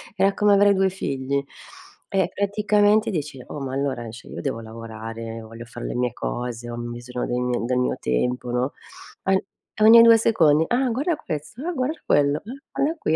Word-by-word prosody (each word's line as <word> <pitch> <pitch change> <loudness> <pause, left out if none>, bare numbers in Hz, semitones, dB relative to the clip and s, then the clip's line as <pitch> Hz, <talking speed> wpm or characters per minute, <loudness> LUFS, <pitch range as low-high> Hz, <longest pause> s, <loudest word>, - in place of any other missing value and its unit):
era 195 0 +3
come 205 0 +3
avere 200 0 +5
2 190 0 +2
figli. 140 -6 -2 0.7
E 190 -1 +1
praticamente 210 +2 +2
dici: 150 -6 -4
"Oh, 150 - -6
ma 130 -1 -4
allora, 130 -4 -2
cioè 115 - -12
io - - -6
devo 135 -5 -2
lavorare, 115 0 -7
voglio 115 +1 -10
fare 120 - -8
le - - -4
mie 125 -1 0
cose, 120 - -4
ho 120 - -5
bisogno 120 +1 -5
del 125 0 -1
mio 125 -1 -1
del 125 0 0
mio 125 - +1
tempo", 125 - -1
no? 125 +3 0 0.5
Ogn 190 0 +3 0.4
ogni 230 +1 +10
2 230 -1 +8
secondi: 160 -9 +4
"Ah, 250 +1 +1
guarda 290 +8 0
questo, 155 - -6
ah 355 - -1
guarda 280 +4 -2
quello, 145 0 +3
ah - - -8 0.3
guarda 310 +4 0
qui". 160 - +1
140 Hz, 185 wpm, -23 LUFS, 120-205 Hz, 0.7 s, ogni